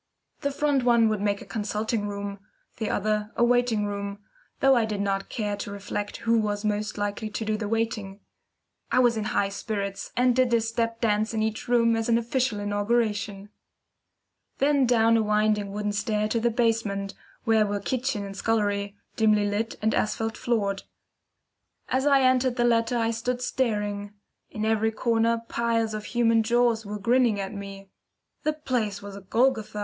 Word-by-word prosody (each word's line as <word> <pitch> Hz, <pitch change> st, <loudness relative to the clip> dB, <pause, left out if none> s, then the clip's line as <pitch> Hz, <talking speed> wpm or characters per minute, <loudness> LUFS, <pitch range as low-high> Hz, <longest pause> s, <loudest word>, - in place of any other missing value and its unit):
The 280 Hz, -, -1 dB
front 280 Hz, -1 st, +1 dB
one 235 Hz, -2 st, +4 dB
would 215 Hz, -2 st, -1 dB
make 200 Hz, -1 st, 0 dB
a -, -, -14 dB
consulting 215 Hz, 0 st, -2 dB
room, 200 Hz, 0 st, -5 dB, 0.4 s
the 220 Hz, -, -2 dB
other 210 Hz, +1 st, -1 dB
a -, -, +2 dB
waiting 240 Hz, -3 st, +2 dB
room, 200 Hz, 0 st, -4 dB, 0.4 s
though 270 Hz, -1 st, +5 dB
I 235 Hz, -, +3 dB
did 215 Hz, -2 st, -2 dB
not 195 Hz, -1 st, -1 dB
care 210 Hz, -2 st, -2 dB
to 205 Hz, -, -5 dB
reflect 205 Hz, 0 st, -4 dB
who 230 Hz, 0 st, +4 dB
was 210 Hz, -1 st, -2 dB
most 210 Hz, 0 st, -1 dB
likely 205 Hz, +1 st, -2 dB
to 220 Hz, +1 st, -4 dB
do 215 Hz, 0 st, 0 dB
the 215 Hz, -1 st, -3 dB
waiting. 220 Hz, -3 st, -2 dB, 0.7 s
I -, -, +2 dB
was 245 Hz, -2 st, +4 dB
in 220 Hz, -, -2 dB
the 215 Hz, -, -2 dB
highest 200 Hz, 0 st, -1 dB
spirits, 200 Hz, -3 st, -4 dB
and 250 Hz, 0 st, +4 dB
did 255 Hz, -1 st, +3 dB
a 230 Hz, -, +3 dB
step 230 Hz, 0 st, -2 dB
dance 215 Hz, 0 st, +1 dB
in 215 Hz, -, +1 dB
each 220 Hz, 0 st, -3 dB
room 230 Hz, -1 st, +3 dB
as 225 Hz, +1 st, -1 dB
an 230 Hz, -, +4 dB
official 235 Hz, -1 st, 0 dB
inauguration. 205 Hz, -1 st, -1 dB, 1.1 s
Then 280 Hz, -2 st, +3 dB
down 230 Hz, -1 st, +4 dB
a -, -, +3 dB
winding 210 Hz, -1 st, +1 dB
wooden 210 Hz, +1 st, -2 dB
stair 210 Hz, +1 st, 0 dB
to 230 Hz, -, +1 dB
the 235 Hz, +1 st, +2 dB
basement, 220 Hz, -4 st, 0 dB, 0.3 s
where 220 Hz, -2 st, +3 dB
were 205 Hz, 0 st, -1 dB
kitchen 250 Hz, -1 st, -2 dB
and 195 Hz, 0 st, -8 dB
scullery, 205 Hz, -2 st, 0 dB, 0.2 s
dimly 215 Hz, -2 st, +3 dB
lit, 215 Hz, +3 st, -2 dB
and 220 Hz, -, +2 dB
asphalt 225 Hz, +1 st, -1 dB
floored. 200 Hz, -5 st, -1 dB, 1.1 s
As 265 Hz, +2 st, +1 dB
I 275 Hz, -1 st, +5 dB
entered 255 Hz, -1 st, +3 dB
the 240 Hz, -, +1 dB
latter 235 Hz, 0 st, +2 dB
I 230 Hz, 0 st, +1 dB
stood 245 Hz, +2 st, -2 dB
staring. 210 Hz, -5 st, -2 dB, 0.4 s
In 215 Hz, 0 st, -3 dB
every 220 Hz, 0 st, +2 dB
corner 230 Hz, 0 st, +1 dB
piles 230 Hz, -2 st, 0 dB
of 210 Hz, -1 st, -5 dB
human 230 Hz, -1 st, +3 dB
jaws 230 Hz, -1 st, +2 dB
were 210 Hz, +1 st, -4 dB
grinning 230 Hz, 0 st, +2 dB
at 195 Hz, +1 st, -4 dB
me. 195 Hz, -1 st, -8 dB, 0.5 s
The 305 Hz, -, 0 dB
place 235 Hz, -9 st, -2 dB
was 200 Hz, -1 st, -8 dB
a 200 Hz, -, -9 dB
Golgotha! 220 Hz, +1 st, +1 dB
220 Hz, 180 wpm, -26 LUFS, 205-235 Hz, 1.1 s, though